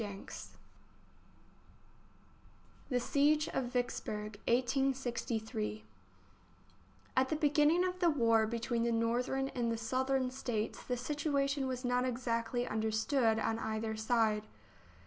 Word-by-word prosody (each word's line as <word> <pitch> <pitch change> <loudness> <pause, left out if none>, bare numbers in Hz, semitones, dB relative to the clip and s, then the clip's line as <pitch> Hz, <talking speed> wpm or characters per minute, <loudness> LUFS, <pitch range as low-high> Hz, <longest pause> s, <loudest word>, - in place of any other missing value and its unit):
THE 250 -3 +2
SIEGE 295 +4 +2
OF 265 - -1
VICKSBURG, 215 -4 -3
1863 235 - 0 1.3
A 260 - +5
T - - -12
the - - +1
beginning 300 +3 +3
of 365 0 -3
the 350 -2 +4
war 230 -6 +3
between 235 +1 -1
the 235 - +2
L\ 230 - +1
Northern 245 +4 0
and 235 -3 -1
the 230 - -1
Southern 255 +3 0
States 240 -5 -3
the 250 - -2
JL - - -6
JL. - - -6
situation 280 -2 0
was 255 0 -3
not 245 0 +2
exactly 240 -1 -1
understood 220 +2 +1
on 225 0 0
either 220 0 -2
side. 220 -1 +1
245 Hz, 125 wpm, -34 LUFS, 225-270 Hz, 1.3 s, A